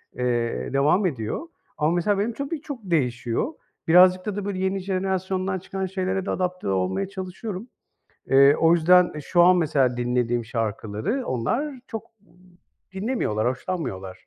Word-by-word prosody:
eee, 120 0 -1
devam 150 +9 +3
ediyor 135 - -3 0.3
ama, 150 +1 +2
mesela, 195 +3 +1
benim 225 +3 -1
tabii 280 +3 -4
çok 285 -6 -7
değişiyor. 130 - -1 0.3
Birazcık 185 +2 +6
da 210 -2 -3
da, 205 -1 -4
böyle, 195 -2 -3
yeni 190 +1 0
jenerasyondan 190 0 -2
çıkan 190 +1 -4
şeylere 190 0 -2
de - - -2
adapte 180 - -2
olmaya 95 - 0
çalışıyorum. 190 +3 -6 0.6
Eee, 140 +1 +6
o 165 +1 +4
yüzden, 175 +2 +5
e, 150 - -5
şu 175 +4 +2
an 180 0 +6
mesela 135 -7 +1
dinlediğim 120 -1 0
şarkıları 115 - -3
onlar 250 - -2
çok 225 -2 -5 0.2
m 165 - -26 0.6
dinlemiyorlar, 190 - -1
hoşlanmıyorlar. 125 - -4
180 Hz, 145 wpm, -24 LUFS, 125-195 Hz, 0.6 s, Birazcık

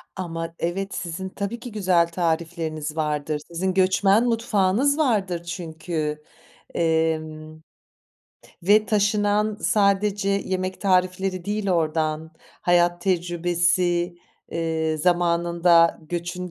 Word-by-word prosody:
Ama, 165 -2 -5
evet, 195 +4 -2
sizin 180 +2 -5
tabii 200 +5 -5
ki 245 0 -8
güzel 185 -5 +2
tarifleriniz 160 -2 -2
vardır. 150 -1 -2
Sizin 185 +2 -2
göçmen 195 +3 +3
mutfağınız 230 +3 +1
vardır 200 - 0
çünkü. 160 -3 -4 0.5
Emm, 155 -1 -1 1.0
ve 210 +4 +4
taşınan 210 0 +1
sadece 200 0 +1
yemek 185 -1 -2
tarifleri 185 -1 +1
değil 205 0 -2
oradan; 160 -2 0 0.3
hayat 175 0 +3
tecrübesi, 175 0 +1 0.4
ııı, 160 -1 -1
zamanında 170 0 +3
göçün 175 +1 -4
175 Hz, 95 wpm, -23 LUFS, 165-195 Hz, 1.0 s, ve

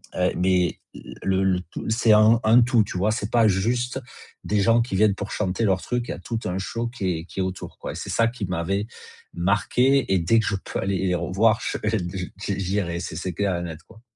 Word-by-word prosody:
heu, 90 0 +1
mais 90 -2 +1 0.4
le 95 0 +1
le 90 -1 +2
tout 90 - -7
c'est 110 0 +3
un 110 +2 +6
un 115 +3 +6
tout, 120 -2 +3
tu 90 - -6
vois? 105 +4 +2
C'est 105 -1 -3
pas 115 -2 +4
juste 120 +7 0 0.4
des 105 -1 0
gens 115 +3 +4
qui 115 -5 -3
viennent 105 -1 +4
pour 100 +1 -6
chanter 100 +2 -1
leur 95 -3 +2
truc, 125 -1 -2
il - - -1
y - - -1
a - - -9
tout 115 +5 -4
un 90 +1 -2
show 115 +5 -3
qui 95 -8 -2
est 80 - -9
qui 95 - -8
est - - +2
autour, 95 0 -6
quoi, - - -6
c'est - - -6
ça 115 0 +2
qui 115 -4 -4
m'avait 95 +4 -2 0.5
marqué 105 +8 +2
et 95 - +3
dès 100 +7 +3
que - - -1
je 100 - 0
peux - - -5
aller 95 0 0
les 90 - +1
revoir, 110 +5 +2
je - - -2
heu - - -14
et 90 -1 -4
j'i 100 -1 -2
j'irai 90 -3 -1
c'est 80 - -6
c'est 90 +2 -3
clair 100 0 0
et - - -4
net, 80 -1 -7
quoi. 110 0 -17
100 Hz, 245 wpm, -24 LUFS, 90-115 Hz, 0.5 s, un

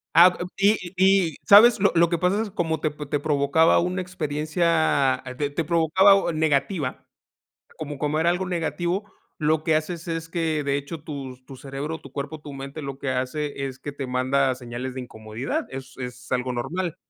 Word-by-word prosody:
Ah 175 +2 +8
ah, 175 - -3
y 205 +2 +4 0.2
y, 190 -4 +4
¿sabes? 220 +4 +8
Lo 200 - +4
lo 170 0 +5
que 170 - 0
pasa 185 +5 +1
es 225 - -3
como 165 -4 -1
te 155 - 0
te 150 0 -3
provocaba 145 +2 +3
una 180 +2 -1
experiencia 155 -4 +1 0.2
de 145 -1 -1
te 155 +3 -2
provocaba 170 +5 +5
un 170 -5 -1
negativa, 145 -1 0 0.7
como 150 -2 -6
como 150 +1 0
era 170 +2 +3
algo 180 +2 -1
negativo, 175 +3 -2 0.3
lo 155 0 +1
que 160 - +2
haces 165 +3 -4
es 165 0 -3
que, 160 -3 -1
de 140 0 +1
hecho, 145 +2 -6
tus 135 -4 -8
tu 130 0 -11
cerebro, 140 +4 -5
tu 135 - -14
cuerpo, 145 +2 -5
tu 145 -1 -9
mente, 140 +3 -7
lo 140 -1 -6
que 135 - -3
hace 140 +2 -2
es 130 -1 -7
que 145 - -6
te 140 -2 -5
manda 130 +1 +1
señales 125 +1 -6
de 130 - -4
incomodidad. 110 +1 -5
Es 135 0 -8
es 125 0 -8
algo 125 0 0
normal. 160 +8 -3
150 Hz, 190 wpm, -24 LUFS, 135-170 Hz, 0.7 s, Ah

